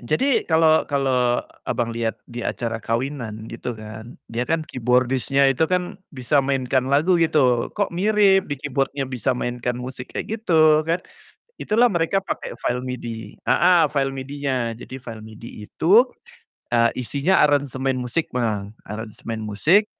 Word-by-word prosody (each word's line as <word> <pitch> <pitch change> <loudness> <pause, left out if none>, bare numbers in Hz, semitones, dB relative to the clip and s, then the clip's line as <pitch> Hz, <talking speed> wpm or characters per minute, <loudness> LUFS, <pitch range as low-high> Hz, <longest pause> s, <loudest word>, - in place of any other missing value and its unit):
Jadi, 225 - +1
kalo 160 -1 +4
kalo 130 -4 +1 0.2
Abang 115 -1 -1
liat 115 -1 -2
di 120 -1 -7
acara 115 -1 -3
kawinan 115 -3 -3
gitu 115 0 -5
kan 110 +2 -10 0.2
dia 120 +2 -2
kan 160 -1 0
keyboardist-nya 130 +2 +1
itu 160 +5 +1
kan 180 0 -2
bisa 140 0 +1
mainkan 130 -1 0
lagu 165 +5 +3
gitu, 135 -7 +3
kok 205 -4 0
mirip 195 0 +3
di 145 - -2
keyboard-nya 135 0 -2
bisa 130 0 -1
mainkan 120 0 -2
musik 125 0 -7
kayak - - -3
gitu 155 -6 +5
kan, 170 +2 +1 0.6
itulah 235 +3 +3
mereka 175 +1 +1
pake 195 - -5
file 125 +1 -1
MIDI, 115 -4 -6
heeh, 175 0 +4
file 135 -2 0
MIDI-nya, 130 -4 -3
jadi 130 - -9
file 115 -3 -9
MIDI 110 -1 -10
itu, 210 - +4 0.7
eee, 115 0 +4
isinya 140 +9 +1
aransemen 135 -2 0
musik, 125 +7 -1
Bang, 105 -4 -2 0.2
aransemen 110 +1 -6
musik 150 - +3
130 Hz, 145 wpm, -22 LUFS, 120-155 Hz, 0.7 s, gitu